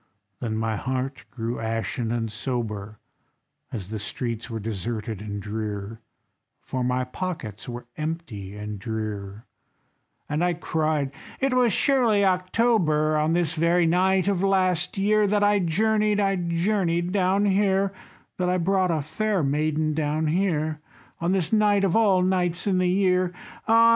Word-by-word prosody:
Then 110 Hz, -2 st, -2 dB
my 110 Hz, -1 st, -1 dB
heart 130 Hz, +2 st, -3 dB
it -, -, -19 dB
grew 115 Hz, 0 st, -4 dB
ashen 115 Hz, +1 st, -2 dB
and 115 Hz, -2 st, -2 dB
sober, 110 Hz, -3 st, -4 dB, 0.7 s
As 100 Hz, -4 st, -6 dB
the 110 Hz, -, -3 dB
streets 115 Hz, +2 st, -4 dB
were 115 Hz, -1 st, -4 dB
deserted 110 Hz, 0 st, -4 dB
and 105 Hz, -1 st, -5 dB
drear, 105 Hz, +1 st, -5 dB, 0.6 s
For 130 Hz, -1 st, -3 dB
my 125 Hz, +1 st, +1 dB
pockets 125 Hz, -, -5 dB
were 120 Hz, 0 st, -6 dB
empty 150 Hz, -, -5 dB
and 105 Hz, -1 st, -6 dB
drear; 105 Hz, -1 st, -5 dB, 0.8 s
And 150 Hz, +3 st, -1 dB
I 175 Hz, -1 st, +2 dB
cried: 155 Hz, -4 st, -1 dB, 0.3 s
"It 270 Hz, -1 st, +1 dB
was 250 Hz, -2 st, +4 dB
surely 230 Hz, -4 st, +3 dB
October, 185 Hz, -5 st, +2 dB
On 155 Hz, +1 st, +2 dB
this 175 Hz, -2 st, +1 dB
very 170 Hz, +2 st, +3 dB
night 185 Hz, +3 st, +3 dB
of 195 Hz, -3 st, +1 dB
last 185 Hz, -2 st, +1 dB
year, 210 Hz, +1 st, +3 dB
That 205 Hz, +1 st, +2 dB
I 205 Hz, 0 st, +4 dB
journeyed, 210 Hz, +4 st, +2 dB
I 195 Hz, -1 st, +2 dB
journeyed 175 Hz, 0 st, 0 dB
down 195 Hz, +1 st, +2 dB
here, 195 Hz, -1 st, +2 dB, 0.4 s
That 180 Hz, -1 st, 0 dB
I 180 Hz, -, +2 dB
brought 185 Hz, +1 st, +2 dB
a 160 Hz, -3 st, 0 dB
fair 205 Hz, +4 st, -1 dB
maiden 155 Hz, +2 st, 0 dB
down 155 Hz, +1 st, 0 dB
here, 155 Hz, -3 st, 0 dB, 0.4 s
On 170 Hz, +2 st, 0 dB
this 190 Hz, 0 st, 0 dB
night 205 Hz, -2 st, +4 dB
of 190 Hz, -3 st, +2 dB
all 200 Hz, -5 st, +4 dB
nights 180 Hz, -2 st, 0 dB
in 190 Hz, -3 st, +2 dB
the 180 Hz, -1 st, +2 dB
year! 185 Hz, -1 st, +2 dB, 0.4 s
Ah! 230 Hz, +1 st, +6 dB
165 Hz, 155 wpm, -25 LUFS, 120-190 Hz, 0.8 s, Ah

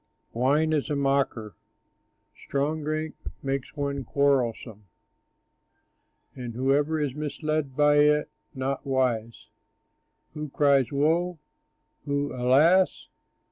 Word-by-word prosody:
Wine 145 Hz, +6 st, +2 dB
is 150 Hz, 0 st, 0 dB
a 145 Hz, -, 0 dB
mocker, 135 Hz, -, 0 dB, 0.9 s
strong 145 Hz, +3 st, -1 dB
drink 155 Hz, +1 st, -3 dB, 0.3 s
makes 135 Hz, +1 st, -3 dB
one 140 Hz, -1 st, -2 dB
quarrelsome, 120 Hz, -6 st, 0 dB, 1.5 s
And 120 Hz, -2 st, -7 dB
whoever 145 Hz, +5 st, +1 dB
is 145 Hz, -4 st, -1 dB
misled 150 Hz, -1 st, -3 dB
by 145 Hz, 0 st, +4 dB
it 150 Hz, 0 st, +4 dB, 0.3 s
is -, -, -35 dB
not 135 Hz, +1 st, -2 dB
wise. 125 Hz, -4 st, -1 dB, 0.8 s
Who 150 Hz, -1 st, -6 dB
cries, 140 Hz, -2 st, +2 dB
"Woe"? 165 Hz, +5 st, +1 dB, 0.7 s
who, 145 Hz, 0 st, -1 dB
"Alas"? 145 Hz, +10 st, +3 dB
140 Hz, 100 wpm, -26 LUFS, 130-150 Hz, 1.5 s, by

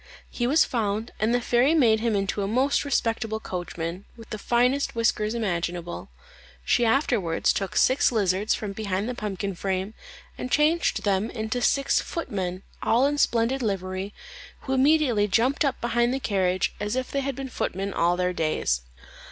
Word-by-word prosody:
He 240 Hz, -, -1 dB
was 300 Hz, +5 st, +4 dB
found, 220 Hz, -1 st, -2 dB
and 220 Hz, +2 st, +1 dB
the 245 Hz, -, +3 dB
fairy 245 Hz, +6 st, +3 dB
made 230 Hz, -8 st, +4 dB
him 225 Hz, -1 st, 0 dB
into 200 Hz, +1 st, -1 dB
a 195 Hz, -, -1 dB
most 255 Hz, +6 st, +1 dB
respectable 225 Hz, -5 st, -1 dB
coachman, 175 Hz, -1 st, -5 dB
with 230 Hz, -, -13 dB
the 215 Hz, -, -4 dB
finest 250 Hz, +5 st, +1 dB
whiskers 225 Hz, -1 st, +1 dB
imaginable. 175 Hz, -, -3 dB, 0.6 s
She 240 Hz, -, +3 dB
afterwards 225 Hz, -, +1 dB
took 195 Hz, -1 st, -3 dB
six 260 Hz, +1 st, +4 dB
lizards 205 Hz, -2 st, +1 dB
from 210 Hz, -2 st, -5 dB
behind 200 Hz, 0 st, -2 dB
the 250 Hz, -, -2 dB
pumpkin 200 Hz, -3 st, -4 dB
frame, 190 Hz, +3 st, -3 dB, 0.5 s
and 255 Hz, -, -4 dB
changed 310 Hz, +5 st, +2 dB
them 200 Hz, +2 st, +1 dB
into 220 Hz, +2 st, -3 dB
six 275 Hz, +2 st, +2 dB
footmen, 190 Hz, -, -4 dB, 0.2 s
all 240 Hz, +4 st, +3 dB
in 290 Hz, +1 st, 0 dB
splendid 240 Hz, +3 st, +2 dB
livery, 190 Hz, -2 st, -3 dB, 0.5 s
who 265 Hz, -, -3 dB
immediately 265 Hz, -6 st, +3 dB
jumped 240 Hz, +9 st, +2 dB
up 275 Hz, -3 st, 0 dB
behind 240 Hz, +1 st, +1 dB
the -, -, -2 dB
carriage, 185 Hz, -6 st, 0 dB
as 210 Hz, +3 st, -2 dB
if 255 Hz, 0 st, -3 dB
they 280 Hz, -, 0 dB
had 275 Hz, -1 st, -3 dB
been 270 Hz, 0 st, -5 dB
footmen 195 Hz, -5 st, -3 dB
all 175 Hz, +1 st, +2 dB
their 180 Hz, 0 st, 0 dB
days. 155 Hz, -, 0 dB
220 Hz, 170 wpm, -25 LUFS, 195-250 Hz, 0.6 s, was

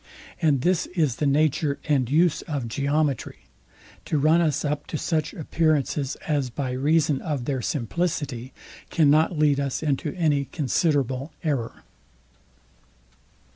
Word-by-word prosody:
And 145 Hz, -6 st, +3 dB
this 180 Hz, +3 st, +1 dB
is 150 Hz, -9 st, +1 dB
the 150 Hz, -, 0 dB
nature 145 Hz, 0 st, +2 dB
and 135 Hz, -5 st, +2 dB
use 165 Hz, +3 st, +3 dB
of 140 Hz, -7 st, -3 dB
geometry, 140 Hz, +2 st, -1 dB, 0.6 s
to 155 Hz, -, 0 dB
run 155 Hz, +4 st, +4 dB
us 155 Hz, -3 st, 0 dB
up 145 Hz, 0 st, -2 dB
to 155 Hz, -, -3 dB
such 155 Hz, 0 st, -1 dB
appearances, 150 Hz, -3 st, 0 dB
as, 145 Hz, -5 st, 0 dB
by 130 Hz, +1 st, -3 dB
reason 145 Hz, +2 st, +1 dB
of 145 Hz, -7 st, -3 dB
their 135 Hz, -2 st, -1 dB
simplicity, 140 Hz, -1 st, -2 dB, 0.4 s
cannot 155 Hz, +2 st, +3 dB
lead 150 Hz, -2 st, +3 dB
us 140 Hz, +1 st, -2 dB
into 145 Hz, 0 st, -1 dB
any 150 Hz, -5 st, +1 dB
considerable 140 Hz, -1 st, 0 dB
error. 140 Hz, -8 st, -2 dB
145 Hz, 130 wpm, -25 LUFS, 135-155 Hz, 0.6 s, run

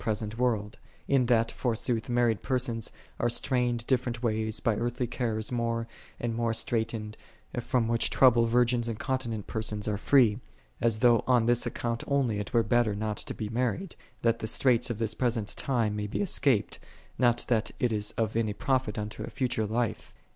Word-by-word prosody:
present 110 Hz, 0 st, -2 dB
world: 115 Hz, -1 st, -1 dB, 0.3 s
in 135 Hz, -3 st, +3 dB
that, 115 Hz, -2 st, +3 dB
forsooth, 120 Hz, -1 st, -2 dB
married 120 Hz, -3 st, +2 dB
persons 120 Hz, -3 st, -1 dB, 0.3 s
are 120 Hz, -, +2 dB
strained 120 Hz, -1 st, 0 dB
different 120 Hz, -2 st, -1 dB
ways 110 Hz, -1 st, 0 dB
by 115 Hz, -, +1 dB
earthly 120 Hz, +3 st, -1 dB
cares 115 Hz, -2 st, -2 dB
more 115 Hz, -1 st, -1 dB, 0.3 s
and 120 Hz, -1 st, -2 dB
more 115 Hz, 0 st, 0 dB
straitened, 110 Hz, -2 st, -1 dB, 0.4 s
from 120 Hz, -1 st, 0 dB
which 115 Hz, 0 st, +2 dB
trouble 120 Hz, -3 st, +5 dB
virgins 120 Hz, 0 st, +2 dB
and 115 Hz, -2 st, -3 dB
continent 120 Hz, -6 st, -3 dB
persons 110 Hz, -1 st, -2 dB
are 105 Hz, -1 st, 0 dB
free: 120 Hz, -6 st, +4 dB, 0.4 s
as 115 Hz, -2 st, +2 dB
though 120 Hz, -2 st, +5 dB
on 125 Hz, -3 st, +4 dB
this 120 Hz, +1 st, +2 dB
account 115 Hz, 0 st, -3 dB
only 130 Hz, -7 st, +1 dB
it 105 Hz, -, -5 dB
were 115 Hz, -2 st, +3 dB
better 115 Hz, -1 st, +2 dB
not 105 Hz, 0 st, -3 dB
to -, -, -5 dB
be 110 Hz, -, -4 dB
married, 125 Hz, -, -2 dB, 0.3 s
that 115 Hz, 0 st, +2 dB
the 110 Hz, -, -4 dB
straits 120 Hz, +1 st, +2 dB
of 120 Hz, -, -3 dB
this 110 Hz, -1 st, -1 dB
present 115 Hz, -4 st, -1 dB
time 115 Hz, -6 st, 0 dB
may 105 Hz, 0 st, -3 dB
be 105 Hz, -, -4 dB
escaped, 135 Hz, -, +2 dB, 0.4 s
not 120 Hz, -2 st, +3 dB
that 110 Hz, -3 st, +1 dB
it 125 Hz, -, +1 dB
is 105 Hz, -1 st, 0 dB
of 110 Hz, -2 st, -1 dB
any 110 Hz, -2 st, 0 dB
profit 130 Hz, -2 st, -1 dB
unto 105 Hz, 0 st, -5 dB
a -, -, -5 dB
future 120 Hz, -4 st, -1 dB
life. 115 Hz, +1 st, -2 dB
115 Hz, 180 wpm, -28 LUFS, 110-125 Hz, 0.4 s, trouble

